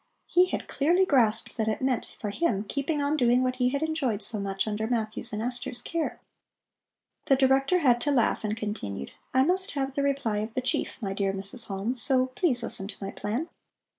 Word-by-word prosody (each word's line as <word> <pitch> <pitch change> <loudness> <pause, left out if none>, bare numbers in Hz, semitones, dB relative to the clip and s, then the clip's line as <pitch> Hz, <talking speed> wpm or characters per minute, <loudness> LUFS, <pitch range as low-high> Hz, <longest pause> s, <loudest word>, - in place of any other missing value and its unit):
He 360 +1 +4
had - - -4
clearly 345 +7 +3
grasped 230 -10 +2
that 220 -1 0
it 220 - 0
meant 260 -2 -1
for 210 - -3
him 205 -7 0
keeping 285 +6 -1
on 285 +2 +1
doing 250 -2 +3
what 255 0 -1
he 250 -1 +2
had 280 +3 -1
enjoyed 280 -10 0
so 215 - -1
much 195 +1 -2
under 215 +1 -1
Matthew's 225 0 -1
and 215 +1 -3
Esther's 245 +1 0
care. 330 +5 -3 1.1
The 270 - +5
Director 270 +5 +3
had 245 -5 +4
to 290 - +1
laugh, 240 -5 +2
and 215 +1 -2
continued: 105 - -4 0.2
"I 260 +1 +4
must 375 +5 +1
have 270 -2 -2
the 280 - -1
reply 275 -6 0
of 215 +2 -4
the 255 - 0
chief, 255 - -1
my 195 -1 -1
dear 195 -1 0
Mrs. 200 +5 -3
Halm, 205 +6 -2
so 255 +3 +3
please 250 -4 +1
listen 195 -4 -3
to 200 - -9
my 195 -1 -5
plan. 230 +10 -3
245 Hz, 205 wpm, -27 LUFS, 215-275 Hz, 1.1 s, The